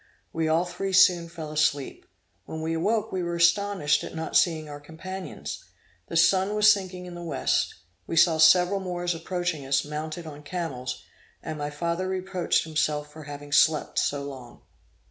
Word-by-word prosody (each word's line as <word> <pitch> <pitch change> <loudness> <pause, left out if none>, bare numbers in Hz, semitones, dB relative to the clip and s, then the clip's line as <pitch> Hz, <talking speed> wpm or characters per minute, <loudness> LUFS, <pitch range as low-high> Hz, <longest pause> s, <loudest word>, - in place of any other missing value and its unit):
We 160 -1 0
all 160 +3 +2
three 185 +2 -4
soon 180 -3 +5
fell 160 -2 -7
asleep. 150 -2 0 0.4
When 160 0 -6
we 165 +1 -1
awoke 210 +7 0
we 185 - -2
were 170 0 -2
astonished 170 -2 +2
at - - -7
not 160 0 -4
seeing 160 -3 +3
our 145 0 -8
companions. 180 +5 -7 0.4
The 165 - -2
sun 190 +5 +3
was 210 0 +7
sinking 185 -2 -6
in 180 - -9
the 175 - -8
west. 170 - 0 0.3
We - - -3
saw 160 -1 +5
several 180 +4 +6
Moors 175 -2 -2
approaching 175 -2 -3
us, 135 +1 +1
mounted 155 +3 -5
on 150 -2 -9
camels; 140 -6 -5 0.4
and 155 -2 -5
my 145 0 -2
father 170 +5 -2
reproached 185 -1 0
himself 150 -2 -1
for 155 -1 -10
having 145 0 -9
slept 155 +1 +3
so 140 -1 -1
long. 130 -4 -10
165 Hz, 170 wpm, -26 LUFS, 150-180 Hz, 0.4 s, was